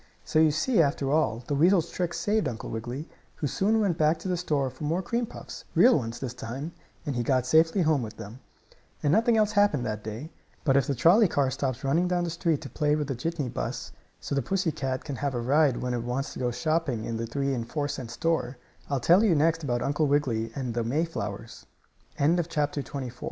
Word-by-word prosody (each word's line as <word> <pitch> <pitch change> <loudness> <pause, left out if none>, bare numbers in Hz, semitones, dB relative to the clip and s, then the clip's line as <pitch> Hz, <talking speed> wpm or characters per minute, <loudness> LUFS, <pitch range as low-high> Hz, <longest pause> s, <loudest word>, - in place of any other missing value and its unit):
] - - -34
So 155 - +1
you 160 0 +6
see, 170 - +2
after 140 -2 0
all, 125 -7 +1
the 145 - -2
weasel's 170 +3 +3
trick 175 -2 -2
saved 215 +1 +1
Uncle 110 - -5
Wiggily, 120 +7 -5 0.3
who - - -4
soon 205 - +1
went 195 -6 0
back 155 +1 +3
to 165 - -7
the 180 - +1
store 145 -6 -1
for 130 +4 -10
more 165 +5 0
cream 235 +5 -1
puffs - - -9
real 255 - +7
ones 115 -4 -2
this 125 -3 -4
time, 125 +6 -6 0.3
and 145 - -2
he 120 - 0
got 130 +1 +1
safely 160 +7 +4
home 155 -4 +2
with 110 -2 -7
them. 110 +3 -9 0.6
And 145 - +3
nothing 230 +1 +4
else 215 -1 +3
happened 205 - +2
that 105 -2 -3
day. 110 +9 -6 0.3
But 135 -4 +3
if 140 -3 +3
the 140 - 0
trolley 175 - +5
car 140 -5 +1
stops 130 -1 -3
running 160 +6 +2
down 180 -1 0
the 170 - -2
street 165 -3 0
to 145 - -7
play 150 0 +1
with 150 -2 -2
the - - 0
jitney 150 +2 -2
bus, - - -4 0.3
so - - -5
the 140 - +1
pussy 185 - 0
cat 130 -3 -3
can 140 - -4
have 140 -2 -2
a - - -1
ride 135 +2 +3
when 125 0 -2
it 120 - -1
wants 125 +3 -3
to - - -8
go 125 - 0
shopping 125 -1 -1
in 115 - -3
the 115 0 -3
three 140 +3 -1
and 115 -2 -4
four 145 -2 -1
cent 130 -4 -5
store, 135 -1 -1 0.3
I'll 140 - 0
tell 175 - +5
145 Hz, 205 wpm, -27 LUFS, 125-170 Hz, 0.6 s, real